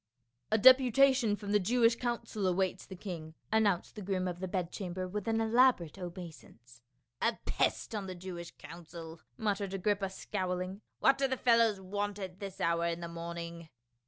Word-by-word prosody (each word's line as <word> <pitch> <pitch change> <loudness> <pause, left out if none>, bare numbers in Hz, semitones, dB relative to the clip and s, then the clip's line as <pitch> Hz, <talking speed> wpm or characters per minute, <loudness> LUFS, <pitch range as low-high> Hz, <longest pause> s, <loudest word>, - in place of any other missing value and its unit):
A 220 - +4
DEPUTATION 260 -1 +6
from 205 -1 -6
the 210 - +4
Jewish 230 +4 +3
council 230 -4 -2
awaits 185 0 0
the 190 - -8
king," 170 -4 -7 0.2
announced 210 -5 +2
the 210 - -8
groom 185 -1 -1
of 175 -1 -4
the 185 - -3
bed 180 -2 -2
chamber 185 -2 -4
with 210 +4 -4
an 225 0 +2
elaborate 225 - +3
obeisance. 160 -9 -10 0.2
" 120 -1 -52
A 230 -1 +1
pest - - 0
on 205 -3 -3
the 185 - -5
Jewish 175 -1 -7
council 165 -1 -10
!" - - -44
muttered 200 -3 -1
Agrippa 195 0 0
scowling. 185 0 -3
" - - -52
What 270 0 +5
do 275 - +3
the 260 0 -1
fellows 230 -5 +4
want 205 +2 -3
at 190 -2 -7
this 195 -1 -7
hour 170 -1 +1
in 170 0 -2
the 170 - -4
morning?" 170 0 -6
190 Hz, 185 wpm, -32 LUFS, 175-220 Hz, 0.2 s, DEPUTATION